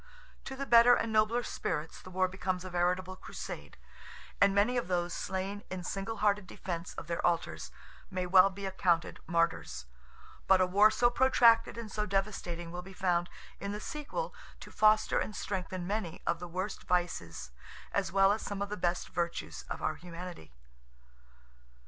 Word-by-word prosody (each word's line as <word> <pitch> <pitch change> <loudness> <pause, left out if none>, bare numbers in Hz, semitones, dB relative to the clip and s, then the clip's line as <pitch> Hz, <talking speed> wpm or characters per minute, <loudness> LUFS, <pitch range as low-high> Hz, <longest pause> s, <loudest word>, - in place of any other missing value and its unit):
To 265 - -5
the 275 +1 -4
better 240 0 +7
and 225 -1 -1
nobler 220 +3 +3
spirits 155 -7 -3
the - - -11
war 185 0 +1
becomes 185 0 -3
a 185 - -6
veritable 180 +1 0
crusade, 70 - -8 0.6
and 200 0 +5
many 210 +5 +3
of 245 - 0
those 175 -1 0
slain 195 +2 -3
in 185 -1 -5
single 195 +5 -4
hearted 205 -2 +1
defence 175 -1 -5
of - - -6
their 170 0 -3
altars 165 - 0 0.4
may 185 -1 -2
well 185 +1 +7
be 195 +1 -7
accounted 180 -3 +1
martyrs—but 65 - -1
a 185 - +5
war 200 +4 +6
so 240 +2 +3
protracted 235 -3 +4
and 225 -3 -6
so 210 +1 -2
devastating 180 -4 -2
will 175 +1 -5
be 190 +2 -12
found, 175 -2 +1 0.3
in 200 0 -4
the 210 - -4
sequel, 300 - -4 0.3
to - - -10
foster 215 0 +4
and 215 - -3
strengthen 185 -2 -3
many 200 -3 -3
of 170 -1 0
the 175 - -6
worst 185 +4 -4
vices 175 - -1 0.4
as 195 -4 0
well 195 +1 +5
as 215 - 0
some 200 -1 -3
of 200 - -5
the 210 - -4
best 175 0 -1
virtues 170 - -3
of - - -5
our - - +1
humanity. 175 - -9
185 Hz, 170 wpm, -31 LUFS, 175-210 Hz, 0.6 s, better